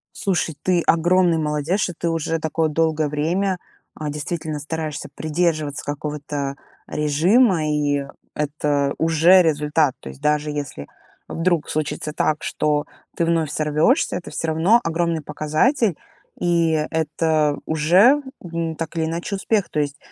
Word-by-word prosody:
Слушай, 175 -5 -1
ты 180 -2 +2
огромный 175 0 +3
молодец, 150 +5 -1
что 180 - -1
ты 170 - -1
уже 165 0 -1
такое 160 0 0
долгое 155 -1 +1
время, 175 +6 0 0.4
э, 155 - -5
действительно 155 +1 -4
стараешься 155 0 -5
придерживаться 155 -3 -1
какого-то 145 -1 -4 0.3
режима, 165 - +3
и 145 -2 0 0.3
это 145 -1 0
уже 165 +3 +5
результат. 150 -2 +1
То 65 - -9
есть 65 - -12
даже 150 0 +1
если 140 - -5 0.4
вдруг 165 -2 0
случится 155 0 -2
так, 155 0 0
что 150 0 0 0.3
ты 170 - +1
вновь 165 -3 +1
сорвешься, 155 - +2
это 175 - -6
всё 165 - -3
равно 170 +9 +4
огромный 165 -1 0
показатель, 175 - +1 0.4
и 170 -2 +2 0.2
это 155 -2 +1
уже, 180 - +4 0.2
ну, 165 -2 -3
так 165 +1 -5
или 160 - +1
иначе 170 +5 -3
успех. 200 0 0
То 150 - -2
есть 145 -1 -2
160 Hz, 135 wpm, -21 LUFS, 150-170 Hz, 0.4 s, уже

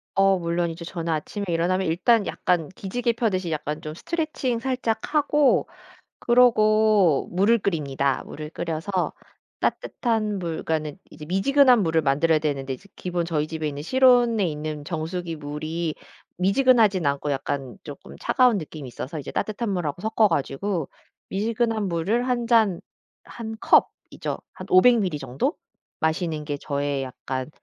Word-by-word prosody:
어 195 -1 +4
물론 170 0 -1
이제 165 +1 -7
저는 170 -2 -4
아침에 200 +6 -3
일어나면 175 +2 0
일단 205 +6 +2
약간 170 -4 0
기지개 230 +6 -2
펴듯이 190 -7 -1
약간 150 +1 -3
좀 155 -2 -6
스트레칭 305 - -2
살짝 255 +1 -2
하고 295 -1 +3 0.5
그러고 215 - +4
물을 205 +6 +3
끓입니다. 140 -7 -1
물을 150 0 -8
끓여서 175 +4 -2 0.5
따뜻한 215 -4 -1
물 165 -3 -4
그러니까는 155 +1 -2
이제 150 - -10
미지근한 245 - +4
물을 160 -1 +2
만들어야 155 +3 +2
되는데 140 -3 -2
이제 200 +10 -12
기본 175 -2 -2
저희 155 -2 -1
집에 160 -1 -3
있는 145 0 -5
실온에 245 -3 +4
있는 150 -1 -4
정수기 165 +2 -4
물이 155 +2 -4 0.5
미지근하지는 205 - +4
않고 140 +1 -2
약간 135 -2 -3
쪼끔 145 -2 -10
차가운 250 -5 +3
느낌이 155 -4 -7
있어서 140 +5 -6
이제 135 - -7
따뜻한 215 +1 -2
물 180 -4 -1
하고 145 +5 -4
섞어 220 0 +3
가지고 165 +2 -2 0.4
미지근한 220 +1 0
물을 200 +9 0
1 240 -2 0
잔 220 -7 +3 0.5
1 225 -1 -7
컵이죠, - - +1 0.2
한 - - -9
500ml 190 -4 +5
정도? 140 - -2 0.4
마시는 160 -1 -1
게 145 -1 -3
저의 140 -1 -2
약간 130 +1 -5
175 Hz, 325 characters per minute, -24 LUFS, 155-220 Hz, 0.5 s, 500ml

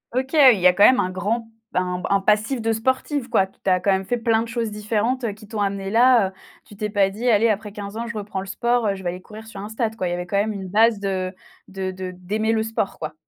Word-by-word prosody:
OK, 260 +3 -1
il 260 -9 +7
y 180 - -1
a 180 - +6
quand 200 - +3
même 255 - +6
un 185 - 0
grand 225 +5 -2 0.3
un 180 0 -1
un 195 -1 +3
passif 215 +5 +1
de 225 0 0
sportif, 260 +3 -1
quoi. 190 - +3
Tu 190 0 -5
as 185 -1 +3
quand 200 - +1
même 190 0 0
fait 245 +5 -1
plein 230 -1 +2
de 230 - -4
choses 230 -2 -3
différentes 215 +2 -1
qui 210 -1 -15
t'ont 215 -2 -4
amené 195 -1 -2
là, 235 -3 +5
heu. 190 - -18 0.3
Tu 205 - -14
t'es 210 +1 -3
pas 200 -2 +2
dit: 230 +5 -2
«Allez, 225 0 +4
après 210 0 -2
15 205 0 -7
ans, 235 - -4
je 235 -2 -5
reprends 205 -2 -4
le 190 - -5
sport, 235 +1 0
heu, 200 - 0
je 190 - -10
vais 175 - -1
aller 180 +1 -6
courir 215 +3 -11
sur 215 -3 -10
un 205 - -7
stade», 220 0 -2
quoi. 185 - -2
Il 175 - -2
y - - -1
avait 175 0 -3
quand 200 +3 -2
même 215 +2 +1
une 195 -2 -6
base 220 +2 +4
de, 190 -1 -3 0.3
de 190 -1 -4
de 185 0 -6
d'aimer 215 +5 -1
le 220 -1 +1
sport, 220 -3 -3
quoi. 155 -1 -5
210 Hz, 285 wpm, -22 LUFS, 195-230 Hz, 0.3 s, il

